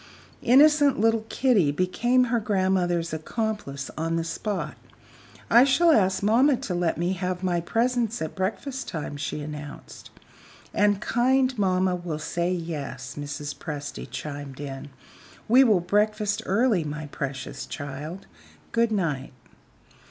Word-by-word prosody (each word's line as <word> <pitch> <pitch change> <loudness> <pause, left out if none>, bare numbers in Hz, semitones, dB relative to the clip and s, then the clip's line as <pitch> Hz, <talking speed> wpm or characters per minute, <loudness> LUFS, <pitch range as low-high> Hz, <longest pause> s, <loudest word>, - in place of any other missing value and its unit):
Innocent 285 +1 +5
little 225 0 +2
Kitty 230 - +3
became 240 - +2
her 240 -1 +1
grandmother's 185 -5 0
accomplice 160 - -3
on 165 +1 -1
the 165 - 0
spot. 165 0 -3 0.7
"I 235 +2 +7
shall 325 +5 +4
ask 190 -7 +3
mamma 250 +6 +4
to 185 - -4
let 175 -2 0
me 175 +3 0
have 185 0 -3
my 175 -2 +1
presents 235 +4 0
at 160 - -4
breakfast 250 +8 -3
time," 155 -4 -5
she 145 +1 -4
announced. 150 -1 -9 0.6
"And 205 -1 +2
kind 255 +2 +2
mamma 185 -3 +1
will 175 -3 -4
say 170 +3 -2
Yes," 145 -8 -5
Mrs. 145 0 -5
Presty 145 -3 -6
chimed 145 -2 -6
in. 140 -1 -6 0.6
"We 255 +4 +7
will 210 -8 +4
breakfast 210 +3 +1
early, 210 -3 +2
my 150 0 -5
precious 135 -2 -5
child. 150 +5 -6 0.5
Good 230 -1 +2
night." 155 -11 -1
185 Hz, 130 wpm, -25 LUFS, 150-225 Hz, 0.7 s, I